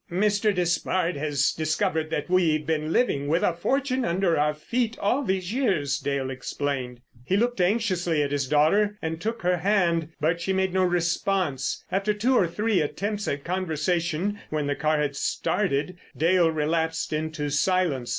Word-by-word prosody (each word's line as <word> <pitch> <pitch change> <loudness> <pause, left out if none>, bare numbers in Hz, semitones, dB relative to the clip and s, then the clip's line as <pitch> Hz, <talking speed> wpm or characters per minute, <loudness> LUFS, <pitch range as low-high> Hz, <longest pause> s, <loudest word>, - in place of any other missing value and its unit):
"Mr. 205 +3 +2
Despard 180 -1 0
has 145 -1 +1
discovered 160 0 -1
that 150 -1 -2
we've 165 -4 +2
been 155 -1 -1
living 145 - +1
with 165 +4 +1
a 175 - +2
fortune 260 +8 0
under 175 -3 +1
our 150 +1 +1
feet 235 +8 -2
all 225 +8 +1
these 190 -2 -2
years," 160 - 0
Dale 140 -2 -2
explained. 130 -1 -4 0.2
He 185 +10 +1
looked 240 -1 +1
anxiously 180 -6 +1
at 140 - -3
his 140 -2 -1
daughter 200 +9 +3
and 160 0 -3
took 225 -2 -3
her 180 0 +2
hand; 175 -4 +1
but 165 +3 0
she 190 +2 -1
made 190 -1 0
no 190 - +2
response. 175 -4 0
After 200 +2 0
two 245 +5 +2
or 185 - +4
three 210 +3 0
attempts 205 +7 -3
at 140 0 -2
conversation 175 +2 -1
when 155 -1 -1
the 145 - 0
car 155 +1 0
had 145 -2 -1
started, 180 +2 -1 0.2
Dale 170 +1 +3
relapsed 160 +1 -1
into 155 -1 -2
silence. 150 -5 +1
170 Hz, 165 wpm, -25 LUFS, 150-195 Hz, 0.2 s, or